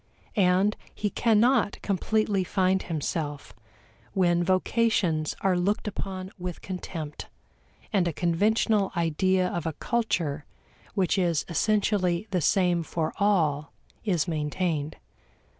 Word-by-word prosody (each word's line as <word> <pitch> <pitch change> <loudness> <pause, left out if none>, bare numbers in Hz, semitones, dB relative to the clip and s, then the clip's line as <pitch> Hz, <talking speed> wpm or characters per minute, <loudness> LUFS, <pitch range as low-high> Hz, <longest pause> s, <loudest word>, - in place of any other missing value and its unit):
And 195 +1 +3 0.2
he 210 -1 -2
cannot 230 -1 +3
completely 205 0 +1
find 190 0 +1
himself 150 -2 -4 0.6
when 175 -2 +2
vocations 185 -4 +1
are 190 -2 +2
looked 195 +5 0
upon 190 -2 -5
with 180 -1 -6
contempt, 170 -5 -6 0.7
and 185 -4 +3
a - - 0
conventional 200 +5 +2
ideal 180 +3 +1
of 170 -1 -2
a 160 - -2
culture 170 -10 -1 0.5
which 190 0 +2
is 170 -4 +1
essentially 195 0 +1
the 180 -2 +1
same 175 0 +3
for 160 -1 -2
all 155 -8 +1 0.3
is 180 -6 +1
maintained. 155 -1 -1
185 Hz, 110 wpm, -27 LUFS, 165-200 Hz, 0.7 s, And